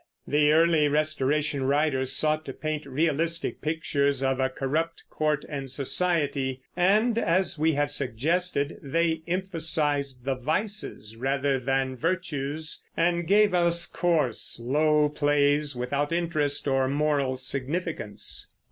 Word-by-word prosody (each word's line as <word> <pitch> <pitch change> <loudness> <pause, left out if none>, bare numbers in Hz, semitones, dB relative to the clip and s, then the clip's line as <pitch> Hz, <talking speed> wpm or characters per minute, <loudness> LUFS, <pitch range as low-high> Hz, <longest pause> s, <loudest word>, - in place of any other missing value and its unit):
The 150 0 +3
early 160 -1 +4
Restoration 150 -1 0
writers 135 -2 +1
sought 155 0 +1
to - - -6
paint 155 -2 -4
realistic 160 +4 0
pictures 145 -3 0
of 135 0 0
a 130 0 +1
corrupt 160 +6 -2
court 150 -1 -1
and 140 -2 -5
society, 140 -2 0
and, 215 +6 +3
as 175 -4 +1
we 160 +1 +2
have 145 0 0
suggested, 145 +4 -1
they 160 +2 0
emphasized 155 -7 0
vices 140 - -2
rather 135 +2 0
than 135 +1 -1
virtues, 155 -2 -3
and 170 0 +1
gave 205 0 +4
us 170 -1 +3
coarse, 155 -13 0
low 150 +5 +2
plays 145 -1 +1
without 140 +5 -2
interest 155 -5 0
or 135 -1 +2
moral 140 -2 0
significance. 140 - -2
150 Hz, 120 wpm, -26 LUFS, 135-165 Hz, -, early